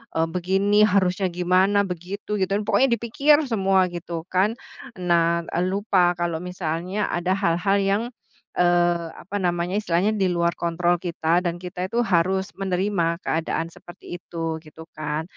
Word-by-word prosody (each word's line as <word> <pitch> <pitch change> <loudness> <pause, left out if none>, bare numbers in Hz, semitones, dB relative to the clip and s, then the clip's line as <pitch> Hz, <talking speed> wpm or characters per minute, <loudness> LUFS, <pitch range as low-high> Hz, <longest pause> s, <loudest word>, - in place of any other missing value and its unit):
eee, 165 0 +2
begini 195 +4 +2
harusnya 190 -2 +2
gimana, 185 +3 +2
begitu 185 +4 -5
gitu, 190 - 0
pokoknya 220 +5 +3
dipikir 285 +7 +3
semua 195 -4 +2
gitu 170 -1 -6
kan. 205 +5 +2 0.4
Nah, 170 -1 +2 0.2
lupa 185 -1 +2
kalau 170 -2 -1
misalnya 180 +2 -3
ada 175 +2 -1
hal-hal 195 +1 +1
yang, 200 +3 +1 0.6
eee, 175 -1 +3
apa 195 +3 -9
namanya, 175 +1 0
istilahnya 195 0 +1
di 200 -3 +1
luar 170 -1 +1
kontrol 175 +1 +1
kita, 170 -1 0
dan 175 -2 -2
kita 180 0 -4
itu 235 +5 0
harus 190 0 +1
menerima 185 -3 0
keadaan 165 +1 -2
seperti 175 0 -10
itu, 165 -2 -4
gitu 160 0 -13
kan. 155 0 -3
180 Hz, 140 wpm, -23 LUFS, 170-195 Hz, 0.6 s, pokoknya